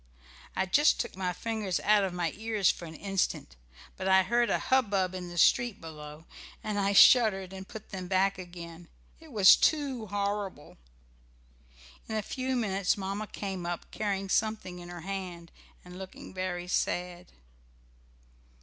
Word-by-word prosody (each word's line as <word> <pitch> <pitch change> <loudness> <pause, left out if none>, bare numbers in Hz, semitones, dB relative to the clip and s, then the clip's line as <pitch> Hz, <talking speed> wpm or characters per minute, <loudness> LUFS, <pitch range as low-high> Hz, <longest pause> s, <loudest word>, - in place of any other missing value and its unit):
I 190 - +1
just 290 +11 +4
took - - -3
my 185 -1 -2
fingers 210 -1 -2
out 210 -1 +4
of 190 - -1
my 175 -2 -2
ears 215 -2 +1
for 170 - -9
an 160 -1 -9
instant, 195 - -2 0.4
but 190 - -3
I 190 0 +6
heard 235 +4 +2
a - - +2
hubbub 200 -8 +1
in 180 -1 -6
the 175 - -9
street 240 +6 +3
below, 150 -1 -10 0.4
and 210 -1 -2
I 200 0 +2
shuddered 195 -3 +6
and 190 0 -8
put 220 - -10
them 185 -2 -5
back 190 +1 +1
again. 175 -1 -9 0.3
It 320 -2 -15
was 205 -5 +8
too 275 -7 0
horrible. 200 - -3 1.3
In 220 - -3
a 215 - -1
few 260 +4 -3
minutes 200 -6 0
Mamma 200 +2 -4
came 190 -4 -5
up, 175 -1 -5
carrying 200 -2 -2
something 210 -4 -1
in 175 0 -10
her 175 -1 -8
hand, 180 -2 -6 0.3
and 180 +1 -10
looking 190 -1 -10
very 180 -1 -3
sad. 180 0 -2
190 Hz, 160 wpm, -29 LUFS, 180-210 Hz, 1.3 s, was